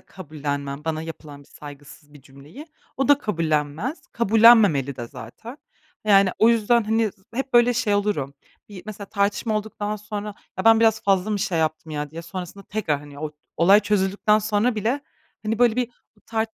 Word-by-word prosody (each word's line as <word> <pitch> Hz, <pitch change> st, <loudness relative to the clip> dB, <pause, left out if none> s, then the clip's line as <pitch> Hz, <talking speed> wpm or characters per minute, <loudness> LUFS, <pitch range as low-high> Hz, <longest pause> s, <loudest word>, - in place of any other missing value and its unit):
kabullenmem 145 Hz, -4 st, -6 dB
bana 160 Hz, -1 st, -2 dB
yapılan 155 Hz, -3 st, -9 dB
bir -, -, -23 dB
saygısız 145 Hz, 0 st, -13 dB
bir 145 Hz, -, -15 dB
cümleyi. 140 Hz, -, -13 dB, 0.3 s
O 270 Hz, +1 st, 0 dB
da 285 Hz, -1 st, +6 dB
kabullenmez. 165 Hz, -, -2 dB
Kabullenmemeli 215 Hz, -, +5 dB
de 120 Hz, -2 st, -6 dB
zaten. 220 Hz, -, -11 dB, 0.5 s
Yani, 195 Hz, -2 st, +5 dB
o 225 Hz, -, +5 dB
yüzden 230 Hz, 0 st, +3 dB
hani, 220 Hz, 0 st, +1 dB
z 190 Hz, -, -30 dB
hep 270 Hz, +1 st, -3 dB
böyle 240 Hz, +1 st, +5 dB
şey 215 Hz, -3 st, +1 dB
olurum, 200 Hz, -10 st, -1 dB, 0.3 s
yi 195 Hz, -3 st, -10 dB
mesela 210 Hz, -1 st, -8 dB
tartışma 205 Hz, +2 st, 0 dB
olduktan 210 Hz, 0 st, -4 dB
sonra 210 Hz, 0 st, -6 dB, 0.2 s
ya 190 Hz, -, -2 dB
ben 225 Hz, 0 st, +6 dB
biraz 220 Hz, -1 st, +3 dB
fazla 195 Hz, +1 st, +1 dB
mı 210 Hz, -, 0 dB
şey 180 Hz, -3 st, -1 dB
yaptım 155 Hz, 0 st, -2 dB
ya 150 Hz, -1 st, -4 dB
diye 165 Hz, +2 st, -8 dB
sonrasında 185 Hz, +2 st, -8 dB
tekrar, 180 Hz, -9 st, -2 dB
hani, 145 Hz, -1 st, -13 dB
o 155 Hz, 0 st, -4 dB, 0.3 s
olay 195 Hz, +5 st, +6 dB
çözüldükten 210 Hz, +1 st, +1 dB
sonra 215 Hz, +3 st, 0 dB
bile 225 Hz, +7 st, -1 dB, 0.4 s
hani 215 Hz, +1 st, -1 dB
böyle 240 Hz, -1 st, +3 dB
bir 245 Hz, -1 st, -1 dB, 0.4 s
tar 220 Hz, -1 st, 0 dB
200 Hz, 175 wpm, -23 LUFS, 155-220 Hz, 0.5 s, da